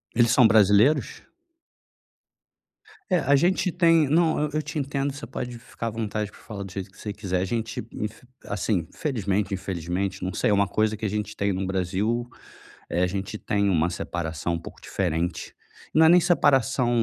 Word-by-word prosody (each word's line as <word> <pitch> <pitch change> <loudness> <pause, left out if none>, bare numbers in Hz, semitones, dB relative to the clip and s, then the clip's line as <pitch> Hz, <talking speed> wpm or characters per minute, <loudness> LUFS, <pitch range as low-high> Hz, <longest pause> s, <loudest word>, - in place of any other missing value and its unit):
Eles 120 0 +4
são 120 -2 +6
brasileiros? 110 +6 +4 1.9
É, 180 - +4
a 140 0 +3
gente 180 +3 +2
tem 165 -4 +4
não, 160 +1 +3
eu 150 0 0
eu 155 - +1
te 155 - -6
entendo, 140 0 -1
você 145 - -8
pode 125 -1 -6
ficar 115 -1 -7
à - - +1
vontade 110 -1 -3
pra - - -18
falar 100 -3 -7
do 95 - -9
jeito 95 -1 -6
que 95 - -22
você 105 -2 -5
quiser. 95 -3 -2
A 95 - 0
gente 115 +2 -3
infe 110 +3 -6 0.2
assim, 100 -4 -1
felizmente, 105 - -1
infelizmente, 95 +1 -3
não 95 - -3
sei, - - +1
é - - +4
uma 100 0 +3
coisa 110 0 0
que 110 - -5
a - - 0
gente 105 0 -3
tem 100 -1 0
no 95 +1 -2
Brasil, 95 +6 -1 0.6
eh, 90 - 0
a - - +4
gente 95 +2 -4
tem 100 -1 0
uma 85 -1 +2
separação 85 -1 -3
um - - -2
pouco - - -11
diferente, 85 -2 -2 0.4
não 160 +1 +6
é - - +7
nem 175 +1 +7
separação 135 - +3
105 Hz, 190 wpm, -25 LUFS, 95-135 Hz, 1.9 s, é